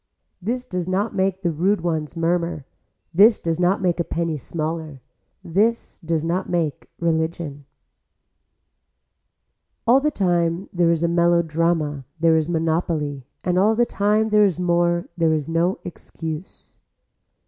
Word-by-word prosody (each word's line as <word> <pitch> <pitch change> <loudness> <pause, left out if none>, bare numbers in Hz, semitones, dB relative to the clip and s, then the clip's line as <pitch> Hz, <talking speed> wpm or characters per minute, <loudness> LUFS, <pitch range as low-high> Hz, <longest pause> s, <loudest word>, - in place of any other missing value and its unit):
This 245 +6 -2
does 180 -7 -4
not 195 +4 0
make 190 0 0
the 170 - +1
rude 185 +5 +1
ones 160 -2 -2
murmur, 170 -3 -1 0.5
this 210 +6 +6
does 165 0 -2
not 185 +2 +2
make 175 -1 +1
a - - +2
penny 165 -1 -2
smaller, 155 0 -4 0.4
this 215 +7 0
does 165 -2 -2
not 180 +3 -1
make 165 -5 -2
religion. 160 -3 -2 2.2
All 245 +3 +6
the 300 +2 +1
time 175 - 0
there 175 -2 +3
is 170 -1 +1
a - - +3
melodrama 165 -4 +1
there 165 0 +4
is 160 0 +1
monopoly 160 -5 -1 0.2
and 180 0 +1
all 215 +3 +4
the 240 +2 +3
time 215 +1 +1
there 210 0 +5
is 185 -4 +1
more 175 -1 +1
there 165 -2 +3
is 150 -3 -1
no 170 +3 +1
excuse. 160 -1 -8
170 Hz, 140 wpm, -22 LUFS, 160-185 Hz, 2.2 s, this